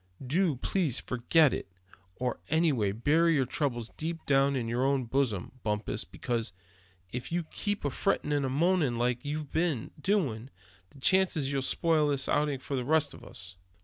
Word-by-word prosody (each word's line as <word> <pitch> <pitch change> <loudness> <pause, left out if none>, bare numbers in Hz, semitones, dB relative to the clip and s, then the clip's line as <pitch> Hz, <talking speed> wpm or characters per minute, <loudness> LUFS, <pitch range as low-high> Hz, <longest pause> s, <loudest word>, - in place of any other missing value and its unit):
Do 165 +3 +2
please 145 0 0
forget 135 +4 +3
it; - - -4 0.5
or 125 -1 -2
anyway 145 -11 +2
bury 155 +10 +3
your 135 -3 +2
troubles 120 -4 -2
deep 165 +1 -4
down 140 0 +3
in 120 -3 -1
your 120 +2 0
own 135 -2 +1
bosom, 115 -6 -1
Bumpus; 105 0 -2
because, 115 -5 -3 0.6
if 125 +5 -5
you 175 0 0
keep 205 +3 -3
on 145 - +1
frettin' 175 -1 0
and 140 -2 +1
moanin' 160 -3 +2
like 120 +2 0
you've 150 0 -4
been 160 -8 0
doing, 135 - 0 0.4
the 140 - -17
chances 185 -2 +3
are 135 - -2
you'll 135 -1 0
spoil 155 +3 +2
this 140 -2 0
outing 145 -1 +1
for 135 +2 -5
the 125 - -1
rest 150 +2 +2
of - - -13
us." 90 -2 -9
140 Hz, 175 wpm, -30 LUFS, 120-160 Hz, 0.6 s, forget